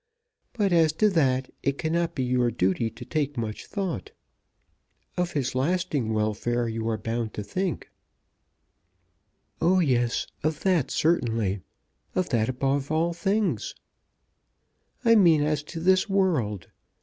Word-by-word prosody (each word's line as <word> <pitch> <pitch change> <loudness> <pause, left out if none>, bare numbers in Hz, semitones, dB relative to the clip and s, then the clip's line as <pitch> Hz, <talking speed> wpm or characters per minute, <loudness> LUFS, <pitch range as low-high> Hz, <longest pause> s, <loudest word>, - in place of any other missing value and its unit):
But 205 -6 +1
as 160 -2 +4
to 210 +6 +3
that, 130 -6 +1
it 140 0 0
cannot 170 +1 -1
be 130 - -1
your 125 -1 +2
duty 105 +1 0
to 115 +2 -11
take 145 -2 -2
much 110 -2 -4
thought. 200 - -3 1.1
Of 180 -1 -1
his 135 -3 -1
lasting 145 -3 0
welfare 110 +3 0
you 115 0 -2
are 110 - 0
bound 115 0 -3
to 105 - -4
think." 185 - -3 1.7
"Oh, 185 +3 +4
yes; 125 -7 +1 0.2
of 155 0 -1
that 180 -8 +2
certainly; 115 - +1 0.5
of 185 -1 0
that 115 -2 +1
above 135 +2 -1
all 165 +2 +1
things." 195 - -1 1.3
"I 230 - +7
mean 170 -8 +5
as 150 -1 0
to 165 - -7
this 185 +4 +3
world. 145 - +1
140 Hz, 135 wpm, -26 LUFS, 115-175 Hz, 1.7 s, I